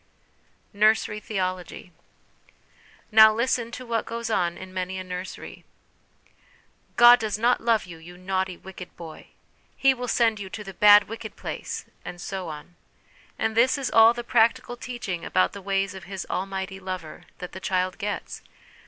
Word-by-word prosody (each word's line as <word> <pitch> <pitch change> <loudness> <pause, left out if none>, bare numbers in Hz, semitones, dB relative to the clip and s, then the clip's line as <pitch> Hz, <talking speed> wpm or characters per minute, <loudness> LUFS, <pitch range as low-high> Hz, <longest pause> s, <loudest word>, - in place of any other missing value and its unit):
Nursery 210 0 +2
Theology. 185 -3 -4 1.2
Now 220 0 +8
listen 235 +1 0
to 255 - -7
what 230 -2 -2
goes 230 0 -4
on 175 -5 0
in 185 0 -10
many 185 0 -3
a 185 - -5
nursery: 185 0 -8 0.7
' - - -33 0.3
God 240 +1 +8
does 215 -3 -2
not 240 +3 +2
love 230 -3 +2
you, 170 -3 -11
you 175 +2 -13
naughty, 185 0 -2
wicked 185 -1 -11
boy! 160 -2 -10 0.2
' - - -38
'He 270 0 +4
will 250 -1 -6
send 225 -2 +2
you 195 -2 -7
to 210 - -7
the 195 -1 -9
bad, 205 +2 +7
wicked 220 -1 -8
place/ - - -6 0.2
and 175 - -8
so 190 -1 -5
on; 155 +3 -10 0.6
and 220 0 -1
this 250 +5 +4
is 275 -2 -3
all 225 +1 +7
the 240 - -5
practical 240 +1 +2
teaching 235 -9 -5
about 185 - +1
the 200 - -8
ways 195 0 -1
of 190 -2 -10
his 190 0 -6
' - - -27
almighty 190 0 -4
Lover' 185 -4 -7
that 180 - -8
the 190 - -8
child 185 -1 -1
gets! 205 0 -4
200 Hz, 170 wpm, -25 LUFS, 185-225 Hz, 1.2 s, Now